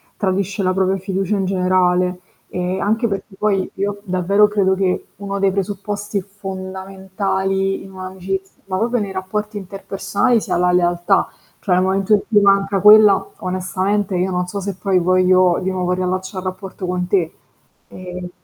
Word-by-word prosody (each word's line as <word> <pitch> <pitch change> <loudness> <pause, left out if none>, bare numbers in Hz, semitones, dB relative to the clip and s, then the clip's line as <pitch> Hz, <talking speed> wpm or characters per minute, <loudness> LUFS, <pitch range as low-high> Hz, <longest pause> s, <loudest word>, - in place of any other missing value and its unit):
tradisce 195 0 -1
la 185 0 +2
propria 190 0 +1
fiducia 195 +1 -2
in 195 - 0
generale. 180 -1 +1 0.3
E, 180 +1 -3
anche 225 +3 +1
perché 195 0 -5
poi 195 -3 0
io 200 +1 -3
davvero 195 +2 +3
credo 195 -2 +2
che 185 -1 -1
uno 200 0 -4
dei 195 -1 +3
presupposti 205 +1 -3
fondamentali 190 0 -3
in 195 - -12
un'amicizia, 190 +1 -6
ma 185 -1 -2
proprio 235 +3 +1
nei 200 -2 -3
rapporti 210 +3 -4
interpersonali 200 +4 -1
sia - - -2
la 180 0 +2
lealtà, 175 +2 +2 0.3
cioè 180 -3 +1
nel 185 - +3
momento 195 +2 +1
in 205 - +4
cui 210 -2 +4
manca 195 0 +3
quella, 210 -1 +7
onestamente 185 +2 -1
io 185 +1 0
non 180 0 -1
so 200 +2 -4
se 195 -1 -4
poi 190 -1 +1
voglio 185 0 +4
di 190 +1 -1
nuovo 180 -1 -1
riallaccià 185 +1 -2
il 185 - -4
rapporto 185 0 -5
con 180 0 -2
te. 180 -4 +1 0.6
Eh 180 -1 -8
190 Hz, 165 wpm, -19 LUFS, 185-200 Hz, 0.6 s, quella